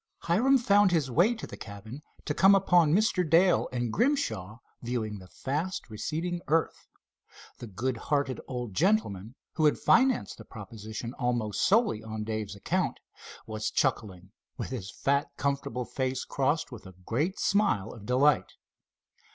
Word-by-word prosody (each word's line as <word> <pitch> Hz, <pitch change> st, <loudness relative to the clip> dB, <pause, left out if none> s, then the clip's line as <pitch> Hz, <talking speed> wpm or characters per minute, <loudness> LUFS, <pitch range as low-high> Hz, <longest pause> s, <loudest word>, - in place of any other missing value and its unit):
Hiram 245 Hz, +11 st, +3 dB
found 205 Hz, -4 st, +4 dB
his 150 Hz, -7 st, +1 dB
way 185 Hz, -, +3 dB
to 220 Hz, -, -7 dB
the -, -, -9 dB
cabin, 110 Hz, +6 st, -9 dB, 0.2 s
to 150 Hz, -, -1 dB
come 195 Hz, +6 st, +6 dB
upon 175 Hz, -5 st, +4 dB
Mr. 195 Hz, 0 st, +3 dB
Dale 170 Hz, +3 st, +3 dB
and 120 Hz, -2 st, -2 dB
Grimshaw 165 Hz, -, 0 dB, 0.2 s
viewing 115 Hz, -4 st, -3 dB
the 95 Hz, -, -13 dB
fast 150 Hz, -, -4 dB
receding 165 Hz, +10 st, -3 dB
earth. 160 Hz, +2 st, 0 dB, 0.7 s
The 120 Hz, -, -7 dB
good 120 Hz, +5 st, -2 dB
hearted 140 Hz, +1 st, -1 dB
old 125 Hz, -5 st, -5 dB
gentleman, 130 Hz, -, 0 dB, 0.2 s
who 155 Hz, -, +1 dB
had 150 Hz, -, +4 dB
financed 260 Hz, 0 st, +2 dB
the -, -, -9 dB
proposition 110 Hz, +2 st, -8 dB
almost 120 Hz, -5 st, -1 dB
solely 210 Hz, -, +3 dB
on 110 Hz, -1 st, -5 dB
Dave's 110 Hz, -2 st, -4 dB
account, 100 Hz, -, -1 dB, 0.5 s
was 110 Hz, 0 st, -3 dB
chuckling, 100 Hz, -9 st, -1 dB, 0.3 s
with -, -, -5 dB
his 105 Hz, -7 st, -5 dB
fat 140 Hz, +7 st, 0 dB
comfortable 140 Hz, -3 st, -2 dB
face 130 Hz, 0 st, -2 dB
crossed 145 Hz, +3 st, 0 dB
with 115 Hz, -5 st, -10 dB
a 95 Hz, -, -13 dB
great 155 Hz, -, -1 dB
smile 195 Hz, -, +1 dB
of 105 Hz, -4 st, -11 dB
delight. 135 Hz, +3 st, +3 dB
130 Hz, 150 wpm, -28 LUFS, 110-175 Hz, 0.7 s, come